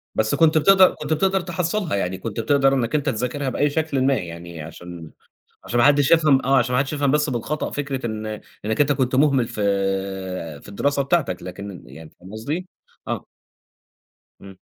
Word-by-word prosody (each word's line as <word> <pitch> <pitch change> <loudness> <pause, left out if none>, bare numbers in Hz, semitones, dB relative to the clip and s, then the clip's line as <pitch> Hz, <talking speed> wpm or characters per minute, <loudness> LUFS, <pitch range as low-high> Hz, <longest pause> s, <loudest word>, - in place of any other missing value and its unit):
بس 110 0 +1
كُنت 160 -1 +4
بتقدر 190 +4 +6
كُنت 150 +1 -2
بتقدر 190 +4 +1
تحصّلها 175 - -2
يعني 95 -1 -2
كُنت 115 -1 -5
بتقدر 135 +4 +3
إنك 125 +1 0
أنت 145 -1 +1
تذاكرها 130 +3 -2
بأي 145 +3 +1
شكلٍ 150 -2 -1
ما 140 - +4
يعني 85 -5 -6
عشان 85 0 -10 0.5
عشان 120 - -2
ما 120 - +5
حدش 145 0 +4
يفهم 155 -6 +4
آه، 135 +1 +4
عشان 125 0 +1
ما 125 - +3
حدش 135 +2 -1
يفهم 140 -2 +1
بس 150 0 +2
بالخطأ 130 +5 -3
فكرة 135 -3 -3
إن 110 -1 -4 0.4
إنك 110 +4 -1
أنت 145 0 +2
كنت 130 -2 0
مُهمل 135 -3 +3
في 105 - -6 1.0
في - - -13
الدراسة 140 +8 0
بتاعتك 135 - 0
لكن 95 0 -8
يعني 75 +5 -12
فاهم 95 +2 -13
قصدي؟ 150 +12 -4 0.4
آه. - - -3 1.2
إمم. 95 -1 -12
135 Hz, 180 wpm, -22 LUFS, 110-150 Hz, 1.2 s, بتقدر